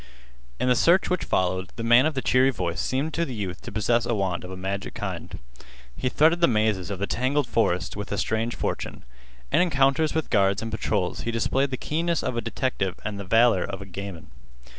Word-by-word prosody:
In - - 0
the 125 - +5
search 170 +11 +3
which 180 - 0
followed, 95 0 0
the 115 - -5
man 120 +5 +6
of 155 - -3
the 130 - -2
cheery 130 +1 +4
voice 90 -9 -2
seemed 140 +5 -1
to 170 - 0
the 130 -7 -4
youth 95 -4 -5
to - - -8
possess 110 +3 +1
a 120 - +1
wand 95 -4 -1
of 90 - -8
a 95 - -7
magic 95 +1 -4
kind. - - -5 0.6
He 130 - -1
threaded 160 +6 +3
the 170 - +6
mazes 105 -5 +1
of 100 - -3
the 100 - -1
tangled 130 +6 0
forest 90 -7 0
with 105 -1 -6
a 100 - -1
strange 110 +3 -1
fortune. - - -4 0.5
In - - +4
encounters 150 -2 +2
with 160 - -2
guards 100 0 +2
and 115 - -4
patrols 105 -4 -1
he - - -3
displayed 130 +4 +1
the 130 - -3
keenness 165 +4 -1
of 130 - -2
a 115 - 0
detective 110 -4 -2
and 105 -2 -4
the - - -4
valor 115 -1 +4
of 100 -1 -5
a 100 - -8
gamin. 95 -2 -8
115 Hz, 220 wpm, -25 LUFS, 100-135 Hz, 0.6 s, man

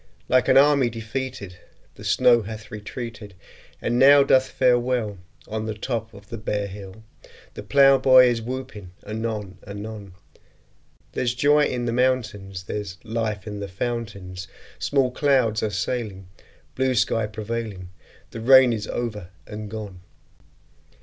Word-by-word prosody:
Like 130 0 +3
an - - +5
army 140 -3 +5
defeated 115 -4 -6 0.3
The - - -13
snow 120 - +4
hath 110 0 -9
retreated, 105 -1 -7 0.4
And 120 +1 -1
now 140 +1 +8
doth 130 -1 +3
fare 125 -1 +3
ill 120 -5 -1 0.3
On 110 0 -4
the 110 - -3
top 115 0 -3
of 100 0 -15
the 115 - -6
bare 105 -1 -2
hill; 100 +1 -10 0.5
The - - -7
plowboy 135 -2 +6
is 120 -2 +1
whooping 115 -6 -7
anon 110 -3 -4
anon: 100 -1 -8 1.0
There's 120 -1 -1
joy 145 +3 +4
in 120 -1 -2
the 115 - -1
mountains; 110 -7 -1
There's 95 -1 -5
life 110 -3 -3
in 105 -1 -6
the 100 - -5
fountains; 95 -4 -5 0.3
Small 135 -3 +1
clouds 125 -6 +2
are 110 - 0
sailing, 100 -1 -3 0.5
Blue 130 -1 0
sky 110 -1 +1
prevailing; 105 -3 -5 0.4
The 115 - -7
rain 130 0 +7
is 105 -1 -4
over 105 -7 -4 0.2
and 105 0 -7
gone! 105 -4 -7
110 Hz, 140 wpm, -23 LUFS, 105-125 Hz, 1.0 s, now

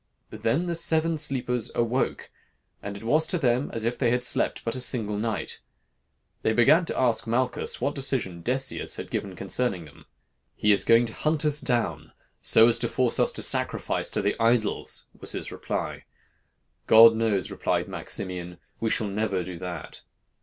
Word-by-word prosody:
Then 135 +10 -1
the 175 - -2
seven 165 0 +2
sleepers 125 -6 -1
awoke, 120 +2 -1 0.5
and 100 0 -6
it 100 - -12
was 155 +7 +1
to 180 - 0
them 130 -3 0
as 115 -1 -2
if 120 +1 -2
they 120 - +2
had 125 +1 +1
slept - - +3
but 115 - -1
a 130 - -3
single 110 -4 0
night. 105 -3 -3 0.8
They 110 - +1
began 145 +10 +4
to - - -4
ask 120 -3 +1
Malchus 125 +3 -1
what 140 +4 -1
decision 130 -11 0
Decius 130 +5 0
had - - -8
given 95 -2 -4
concerning 95 -2 -2
them. 75 - -18 0.5
"'He 105 - +2
is 100 - +3
going 115 +1 +5
to 115 - -6
hunt 155 0 -1
us 150 -1 +1
down, 120 -3 -2 0.3
so 110 - +6
as 120 0 +3
to 120 - 0
force 125 0 0
us - - +3
to - - 0
sacrifice - - 0
to - - -2
the 100 - 0
idols,' 115 -2 0
was - - -1
his - - -4
reply. - - -5 0.8
'God 115 +1 +8
knows,' 110 -4 -1
replied - - -1
Maximian, 90 -2 -4 0.2
'we 115 - -1
shall 110 - 0
never 100 -2 -2
do 90 -1 -8
that.' 90 0 -8
115 Hz, 175 wpm, -25 LUFS, 105-130 Hz, 0.8 s, God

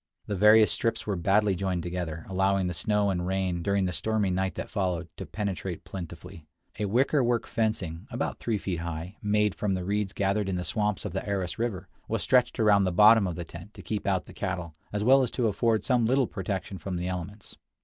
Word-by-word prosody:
The 105 - -3
various 105 +2 +6
strips 115 - -1
were 105 - -1
badly 100 +3 +2
joined 90 -2 -2
together, 85 -2 -4
allowing 95 0 +1
the 90 - -2
snow 105 +3 +1
and 90 -1 -2
rain, 95 -2 -1
during 100 +1 +1
the 90 - -2
stormy 105 +3 0
night 95 +1 -1
that - - -4
followed, 90 -4 -1
to - - -6
penetrate 95 -4 -4
plentifully. 85 -3 -8 0.4
A 105 - 0
wickerwork 120 +1 +2
fencing, 105 -5 -2
about 120 -1 -3
three 115 -3 -1
feet 95 -4 -3
high, 85 +3 -5
made 105 -1 +2
from 100 -2 -1
the 90 -1 -4
reeds 100 0 -1
gathered 100 0 0
in 95 - -1
the 90 - -2
swamps 105 0 -1
of 100 - -4
the 95 - -2
Aras 95 -2 -2
River, 115 -6 -2 0.2
was - - -1
stretched 125 -2 +3
around 105 -3 +5
the 90 - +1
bottom 105 +2 +6
of 90 - -3
the 85 0 -5
tent 85 +5 -11
to - - -10
keep 105 -2 -3
out 95 -2 +1
the - - -13
cattle 90 -4 -4 0.2
as 105 0 -1
well 135 +4 +6
as 125 - 0
to 120 -3 0
afford 110 +1 +1
some 125 -4 +2
little 130 +2 +3
protection 95 -2 -4
from 90 +3 -4
the 90 +1 -2
elements. 95 +3 -6
100 Hz, 215 wpm, -28 LUFS, 90-105 Hz, 0.4 s, various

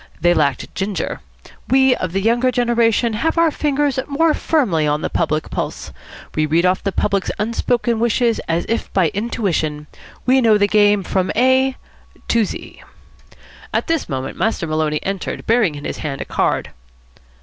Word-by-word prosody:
They 175 +2 +4
lacked 145 -5 0
ginger. 195 0 -3 0.5
We 265 -1 +4
of 185 - -4
the 195 +2 -1
younger 240 +3 +2
generation 235 -2 +2
have 320 +10 -1
our 330 -1 +4
fingers 290 -2 0
more 310 +3 +2
firmly 195 - +1
on 150 +1 0
the - - -2
public 155 -2 -1
pulse. - - -4 0.4
We 155 0 0
read 165 +4 +2
off 185 +1 +1
the 195 - -1
public's 200 0 0
unspoken 230 +2 0
wishes 235 0 +1
as 165 +1 0
if 230 - -2
by 180 -5 +3
intuition. 185 -9 -2 0.4
We 260 +1 +4
know 220 -3 +5
the 205 0 +3
game 205 -1 +3
from 185 0 -1
A 260 +1 +3 0.5
to 230 -2 +3
Z." - - -8 0.9
At - - 0
this 330 -3 -1
moment 135 -1 -4
Master 220 -6 0
Maloney 155 -1 -1
entered, 195 -1 -4
bearing 220 -9 +2
in 145 - -8
his - - -4
hand 140 -3 -4
a - - -4
card. - - -1
210 Hz, 165 wpm, -19 LUFS, 170-245 Hz, 0.9 s, know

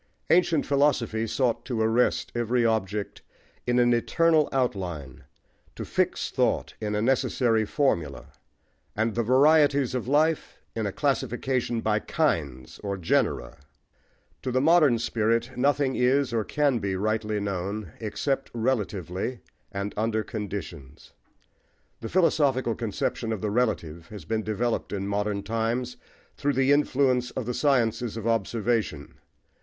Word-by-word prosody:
Ancient 170 -3 +3
philosophy 130 -6 +1
sought 120 +1 0
to 125 -3 -3
arrest 115 +3 +1
every 120 0 +1
object 105 -2 -1 0.5
in 120 0 +2
an 120 0 +4
eternal 155 +6 +2
outline, 90 - -3 0.5
to - - -6
fix - - -1
thought - - 0
in 105 -1 -2
a 105 - 0
necessary 120 -3 +2
formula, 85 - -1 0.7
and 110 +1 0
the 120 - 0
varieties 140 +2 +4
of 125 -2 -3
life 155 +3 +1 0.2
in 110 -2 -1
a - - -2
classification 130 -2 -1
by 110 -1 +1
"kinds," 75 - -2
or 100 -1 -4
genera. 80 -7 0 0.8
To 130 - -3
the 130 - +2
modern 150 -4 +5
spirit 115 +2 0
nothing 140 +1 +1
is, 130 +1 +2
or 115 -2 +1
can 140 0 +1
be 100 -2 -2
rightly 110 +1 -1
known, 100 -1 -3
except 135 +5 -2
relatively 110 -2 -2 0.3
and 100 +1 -4
under 110 0 0
conditions. 100 - -7 0.9
The 115 - -6
philosophical 140 -9 +2
conception 115 0 -3
of 110 -4 -3
the 105 - -1
relative 85 -9 -1
has 105 -1 -10
been 110 -1 -1
developed 110 +2 -2
in 100 -1 -3
modern 100 0 -1
times 115 +3 -2 0.4
through 145 0 0
the 135 +1 +2
influence 130 -3 +2
of 130 - -5
the 125 - -2
sciences 120 -5 +1
of 115 - -5
observation. 115 -7 -1
115 Hz, 135 wpm, -26 LUFS, 105-130 Hz, 0.9 s, modern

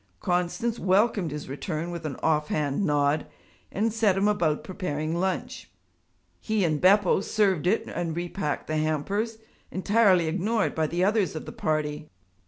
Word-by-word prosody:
Constance 180 +7 -1
welcomed 195 -1 +2
his 150 0 -6
return 155 +4 -4
with 170 -2 -4
an 140 - -5
off 150 -1 +2
hand 150 +4 -1
nod 145 -2 +1 0.4
and 220 +2 0
set 215 -4 +2
him 200 +2 +2
about 170 -8 +1
preparing 160 -4 -3
lunch. 190 +1 -3 0.7
He 215 -2 0
and 155 -3 0
Beppo 195 0 +5
served 195 -6 +1
it 215 +5 +2
and 165 -2 -3
repacked 175 -3 -3
the 155 - -2
hampers, 195 +9 -1 0.3
entirely 190 -2 +3
ignored 195 +7 0
by 160 -1 0
the 175 +3 -1
others 200 -3 +1
of 155 - -5
the - - -7
party. 155 -7 -2
175 Hz, 155 wpm, -26 LUFS, 155-205 Hz, 0.7 s, Beppo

